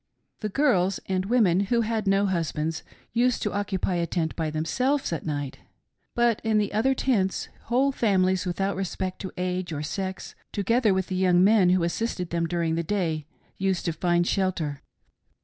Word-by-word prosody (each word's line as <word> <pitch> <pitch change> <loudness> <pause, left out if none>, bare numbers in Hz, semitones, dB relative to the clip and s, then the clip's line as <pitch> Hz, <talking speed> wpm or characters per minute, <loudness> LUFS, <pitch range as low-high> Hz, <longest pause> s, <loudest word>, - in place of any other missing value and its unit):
" - - -51
The 215 - -2
girls 195 -7 +2
and 185 -1 -1
women 210 -7 +3
who 235 +4 +2
had 220 -2 -1
no 195 +1 +3
husbands 160 -3 -1 0.3
used 245 +1 +2
to 210 - -1
oc 205 0 -1
cupy 185 -2 -1
a 170 - -1
tent 165 -3 -2
by 160 -2 -1
themselves 250 - 0
at 165 - -4
night, 145 -3 -3 0.6
but 240 -2 +2
in 220 -1 +2
the 205 -1 0
other 255 +6 +2
tents, 205 -9 0 0.2
whole 260 +4 +2
families, 190 -7 +2
without 195 +3 -1
respect 190 -1 -3
to 190 - -5
age 180 -1 -2
or 150 -1 -3
sex, 190 +4 -4 0.2
together 220 +2 +2
with 190 -1 +1
the 185 - -4
young 180 -1 +4
men 200 -2 +5
who 180 -1 +3
assisted 180 0 -2
them 170 0 0
during 165 -1 0
the 165 - 0
day, 165 -4 -1 0.3
used 190 -2 0
to 170 - 0
find 175 +2 +1
shelter. 175 -8 -1
190 Hz, 185 wpm, -26 LUFS, 170-215 Hz, 0.6 s, men